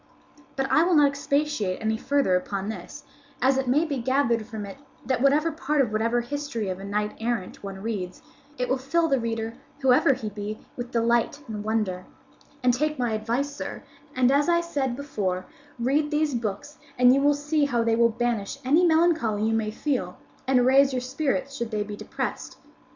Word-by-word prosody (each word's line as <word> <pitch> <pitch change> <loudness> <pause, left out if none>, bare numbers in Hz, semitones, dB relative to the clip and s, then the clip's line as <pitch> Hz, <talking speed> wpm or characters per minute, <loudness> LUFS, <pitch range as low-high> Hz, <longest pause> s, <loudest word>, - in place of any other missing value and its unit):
"But 270 - 0
I - - +5
will 350 +1 +3
not 290 -2 +6
expatiate 280 -8 -1
any 220 0 0
further 270 -5 +1
upon 195 +2 -2
this, 220 - -8 0.4
as 265 +1 +3
it 265 - -2
may 290 +6 +3
be 285 -5 -2
gathered 235 -3 +1
from 220 -3 -6
it 195 - -9 0.3
that 260 -2 0
whatever 295 +4 +3
part 300 -1 -1
of 250 -6 +2
whatever 230 +3 +1
history 240 -5 -4
of 185 0 -4
a - - -8
knight 210 +1 -2
errant 225 -4 -3
one 195 -1 -7
reads, 195 -5 -4 0.3
it 250 - -1
will 260 +1 0
fill 325 +6 +1
the 275 -4 +2
reader, 225 -1 -3 0.3
whoever 265 +1 +5
he 215 -3 -5
be, 205 +1 -5 0.2
with 245 0 -5
delight 235 +4 +1
and 210 -2 -5
wonder; 210 -4 -1 0.6
and 250 -1 +4
take 305 +4 0
my 245 -2 0
advice, 240 +7 -1
sir, - - -6 0.3
and, 255 0 +4
as 290 +4 +3
I 340 0 +4
said 285 -7 -2
before, 200 -10 -3 0.3
read 275 +5 +1
these 300 -1 +1
books 235 +5 -4 0.2
and 250 0 +6
you 275 - +3
will 290 +1 +4
see 295 +1 +1
how 240 -4 +1
they 230 0 +2
will 235 0 +4
banish 235 0 -2
any 305 +7 +4
melancholy 320 -11 +3
you 225 +1 +1
may 220 -1 0
feel 215 -6 -2 0.3
and 255 -2 +4
raise 270 +1 +5
your 255 - -1
spirits 270 +1 -2
should 235 -4 -3
they 210 -2 -1
be 205 0 -7
depressed. - - -5
245 Hz, 195 wpm, -25 LUFS, 220-285 Hz, 0.6 s, not